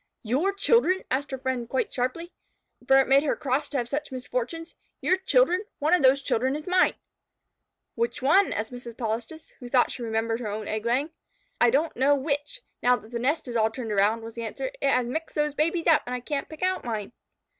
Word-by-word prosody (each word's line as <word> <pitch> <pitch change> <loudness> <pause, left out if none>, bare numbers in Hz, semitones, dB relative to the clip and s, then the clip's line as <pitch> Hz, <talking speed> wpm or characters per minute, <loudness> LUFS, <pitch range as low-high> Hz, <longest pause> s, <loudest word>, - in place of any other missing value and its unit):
"Your 270 - +1
children?" 395 -1 +2
asked 275 +2 0
her 265 - -4
friends 255 -2 -3
quite 260 - -1
sharply, 260 +8 -3 0.5
for 270 - +6
it 270 - +4
made 275 +1 +5
her 300 - 0
cross 285 0 -1
to 285 - -2
have 240 -2 -1
such 290 +3 -4
misfortunes. 255 +6 -4 0.3
"Your 370 - +2
children? 380 0 +2
One 305 +4 +1
of 360 - +5
those 270 +1 +4
children 260 +3 0
is 300 +1 -6
mine." 365 0 +3 1.0
"Which 235 +1 -2
one?" 305 +10 +4
asked 220 +2 -3
Mrs. 240 -2 -9
Polistes, 230 +7 -4
who 245 - -9
thought 245 -1 +3
she - - -7
remembered 225 0 -1
her 225 -4 -4
own 210 +1 -5
egg 215 +1 -2
laying. 270 +7 +1 0.5
"I 240 - +6
don't 295 +7 +1
know 275 +3 +4
which, 290 - -3 0.2
now 250 0 +4
that 220 -2 -11
the 235 - -3
nest 280 +5 0
is 240 - -5
all 220 -1 +3
turned 225 -1 -6
around," 210 +3 +2
was 225 0 -8
the 235 - -6
answer. - - -4
"It 275 - +2
has 250 -2 +2
mixed 315 +7 -4
those 300 -1 0
babies 330 +3 0
up, 325 - +5
and 250 - -2
I - - -3
can't 275 +3 -4
pick 315 +2 -8
out 370 0 0
mine." 220 -3 -4
265 Hz, 220 wpm, -26 LUFS, 235-310 Hz, 1.0 s, for